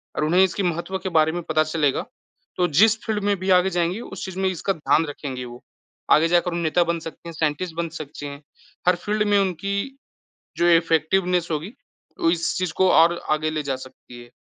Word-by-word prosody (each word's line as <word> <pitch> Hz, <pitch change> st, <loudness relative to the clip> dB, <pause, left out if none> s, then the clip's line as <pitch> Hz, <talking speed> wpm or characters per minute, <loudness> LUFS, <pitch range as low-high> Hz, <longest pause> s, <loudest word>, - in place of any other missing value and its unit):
और -, -, -1 dB
उन्हें 180 Hz, +5 st, +4 dB
इसके 190 Hz, +1 st, 0 dB
महत्व 175 Hz, +2 st, -2 dB
के 190 Hz, -, -4 dB
बारे 155 Hz, 0 st, +4 dB
में 175 Hz, +1 st, -4 dB
पता 155 Hz, -1 st, +2 dB
चलेगा, 155 Hz, -3 st, 0 dB, 0.5 s
तो 180 Hz, -1 st, +2 dB
जिस 215 Hz, +9 st, +4 dB
फ़ील्ड 210 Hz, -2 st, -2 dB
में 205 Hz, 0 st, +2 dB
भी 190 Hz, +1 st, -3 dB
आगे 185 Hz, +1 st, +2 dB
जाएँगे 175 Hz, +3 st, -1 dB
उस 195 Hz, -, -7 dB
चीज़ 190 Hz, 0 st, -7 dB
में 190 Hz, 0 st, +2 dB
इसका 185 Hz, +2 st, -2 dB
ध्यान 160 Hz, 0 st, +1 dB
रखेंगे 130 Hz, -3 st, -6 dB
वो। 120 Hz, 0 st, -11 dB, 0.5 s
आगे 160 Hz, +2 st, +6 dB
जाकर 175 Hz, +1 st, +2 dB
वो -, -, -2 dB
नेता 170 Hz, +2 st, +2 dB
बन 170 Hz, 0 st, -1 dB
सकते 165 Hz, +1 st, -9 dB
हैं, -, -, -8 dB
साइंटिस्ट 160 Hz, +2 st, -2 dB
बन 170 Hz, 0 st, -2 dB
सकते 145 Hz, -1 st, -8 dB
हैं, 140 Hz, +1 st, -9 dB, 0.5 s
हर 180 Hz, -, +5 dB
फ़ील्ड 210 Hz, +4 st, -1 dB
में 205 Hz, -1 st, +3 dB
उनकी 200 Hz, -, -2 dB, 0.6 s
जो 175 Hz, -, +2 dB
इफ़ेक्टिवनेस 170 Hz, +2 st, +1 dB
होगी 165 Hz, -, -3 dB, 0.5 s
वो 165 Hz, -, +3 dB
इस 170 Hz, -1 st, 0 dB
चीज़ 180 Hz, -3 st, -1 dB
को 190 Hz, -1 st, +4 dB
और 170 Hz, +1 st, +4 dB
आगे 155 Hz, +1 st, +1 dB
ले 155 Hz, -1 st, -2 dB
जा 135 Hz, -2 st, -2 dB
सकती 120 Hz, -1 st, -14 dB
है। 120 Hz, -, -19 dB
170 Hz, 210 wpm, -23 LUFS, 155-190 Hz, 0.6 s, आगे